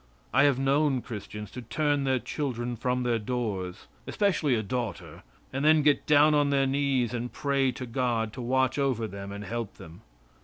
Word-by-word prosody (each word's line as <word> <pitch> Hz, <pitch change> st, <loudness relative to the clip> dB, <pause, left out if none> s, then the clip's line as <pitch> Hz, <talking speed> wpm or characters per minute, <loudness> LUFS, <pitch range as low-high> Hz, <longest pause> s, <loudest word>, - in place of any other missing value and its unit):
I 135 Hz, +2 st, +5 dB
have 140 Hz, -3 st, +3 dB
known 135 Hz, -1 st, +2 dB
Christians 105 Hz, -2 st, -7 dB
to 125 Hz, -, -7 dB
turn 145 Hz, +3 st, 0 dB
their 130 Hz, -1 st, +2 dB
children 125 Hz, -1 st, -3 dB
from 125 Hz, +2 st, -1 dB
their 120 Hz, -2 st, +1 dB
doors, 105 Hz, -6 st, -3 dB, 0.2 s
especially 170 Hz, -10 st, +1 dB
a 110 Hz, -, -1 dB
daughter, 120 Hz, 0 st, -4 dB, 0.3 s
and 135 Hz, +1 st, -2 dB
then 155 Hz, 0 st, +5 dB
get 145 Hz, -1 st, +2 dB
down 150 Hz, 0 st, +6 dB
on 145 Hz, -1 st, +3 dB
their 140 Hz, -1 st, +3 dB
knees 135 Hz, -3 st, +1 dB
and 120 Hz, 0 st, -3 dB
pray 140 Hz, -2 st, +1 dB
to 130 Hz, +1 st, -6 dB
God 115 Hz, -3 st, -1 dB
to 125 Hz, -, -6 dB
watch 130 Hz, +2 st, +1 dB
over 130 Hz, -5 st, +1 dB
them 100 Hz, -1 st, -7 dB
and 100 Hz, +1 st, -6 dB
help 115 Hz, 0 st, -4 dB
them. 80 Hz, +5 st, -13 dB
125 Hz, 185 wpm, -28 LUFS, 115-140 Hz, 0.3 s, down